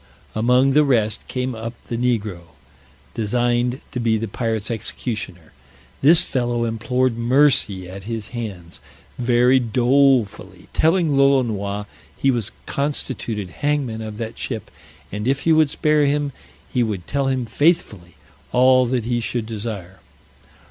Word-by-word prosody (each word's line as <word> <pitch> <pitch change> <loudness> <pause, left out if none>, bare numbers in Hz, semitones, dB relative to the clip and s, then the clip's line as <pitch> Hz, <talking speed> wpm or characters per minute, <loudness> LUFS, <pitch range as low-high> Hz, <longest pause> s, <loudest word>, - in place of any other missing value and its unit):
Among 125 +4 +3
the 150 +2 +5
rest 110 -7 +1
came 130 0 -2
up 115 +1 -6
the 120 - -5
negro, 105 -10 -2 0.6
designed 120 +3 0
to 125 - -3
be 115 -2 +2
the 115 +1 -3
pirates' 110 +1 -2
executioner; 105 -6 -4 0.5
this 165 +5 +7
fellow 120 -3 -1
implored 125 +2 0
mercy 120 -7 +3
at 95 +1 -9
his 110 -1 -5
hands 100 -8 -6 0.4
very 125 +1 +4
dolefully, 125 0 +1
telling 160 -2 +2
Lolonois 110 -7 +2 0.3
he 135 - +2
was 115 -5 -2 0.2
constituted 120 -8 -3
hangman 145 -6 0
of 110 -1 -6
that 115 0 -6
ship, 115 -5 -5 0.4
and 105 +3 -4
if 135 +1 +1
he 165 - +3
would 155 -2 +4
spare 150 0 +2
him, 145 0 0 0.4
he 125 - +2
would 105 -7 -2
tell 140 -1 -1
him 130 -2 0
faithfully 110 - 0 0.4
all 130 0 +5
that 120 -2 -1
he 120 0 0
should 115 0 -2
desire. 105 -5 -6
120 Hz, 135 wpm, -21 LUFS, 110-135 Hz, 0.6 s, this